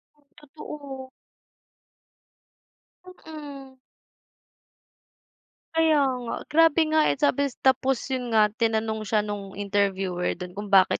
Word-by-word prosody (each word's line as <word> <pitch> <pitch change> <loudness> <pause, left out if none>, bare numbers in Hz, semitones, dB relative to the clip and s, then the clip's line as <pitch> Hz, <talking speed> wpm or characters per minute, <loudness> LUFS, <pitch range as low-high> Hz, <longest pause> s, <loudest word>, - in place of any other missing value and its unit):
Mm, 295 - -32 0.2
totoo. 280 -2 -9 2.0
Mm. 295 -6 -10 2.0
Kaya 320 -1 +4 0.3
nga. 235 - -4 0.2
Grabe 330 0 +5
nga, 315 - +4
eh, - - +1
sabi 280 0 +3 0.2
tapos 265 0 +3
yun 250 -2 -2
nga, 210 -1 +5
tinanong 220 -1 0
siya 210 0 +2
nung 205 -2 -6
interviewer 195 -3 -1
dun 180 +1 -8
kung 205 +3 -7
bakit 195 -2 +4
250 Hz, 105 wpm, -25 LUFS, 205-290 Hz, 2.0 s, Grabe